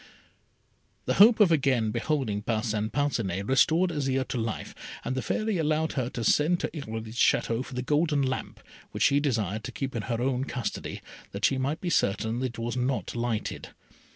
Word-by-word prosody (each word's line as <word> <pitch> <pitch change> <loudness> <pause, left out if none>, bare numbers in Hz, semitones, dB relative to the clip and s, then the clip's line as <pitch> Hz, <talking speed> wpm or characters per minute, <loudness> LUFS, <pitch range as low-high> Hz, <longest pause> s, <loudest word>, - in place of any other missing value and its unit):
The - - +1
hope 225 +2 +8
of 200 -5 +6
again 130 -8 +2
beholding 120 -4 -1
Parcin 110 -1 -1
Parcinet 115 -8 -1
restored 160 - +3
Azire 135 -4 -1
to - - -2
life, 110 -1 -4 0.3
and - - -1
the 130 - -1
Fairy 215 - -1
allowed 155 0 +1
her 125 -3 -2
to 120 - -5
send 155 +9 +3
to - - -1
Irolite's 110 -4 -6
Château 115 +2 +2
for 130 - -10
the 125 - -2
golden 150 +1 +2
lamp, 130 0 -3 0.3
which - - 0
she 140 0 +4
desired 110 - -1
to - - -5
keep 135 -2 -4
in 115 - -1
her 115 -1 0
own 130 +1 0
custody, 120 -7 -4 0.3
that 100 +1 0
she 135 - +2
might 140 +5 -2
be 175 - -2
certain 110 +2 +1
it 130 -2 -3
was 115 +1 -3
not 125 0 -1
lighted. 120 -2 -3
130 Hz, 180 wpm, -27 LUFS, 115-145 Hz, 0.3 s, hope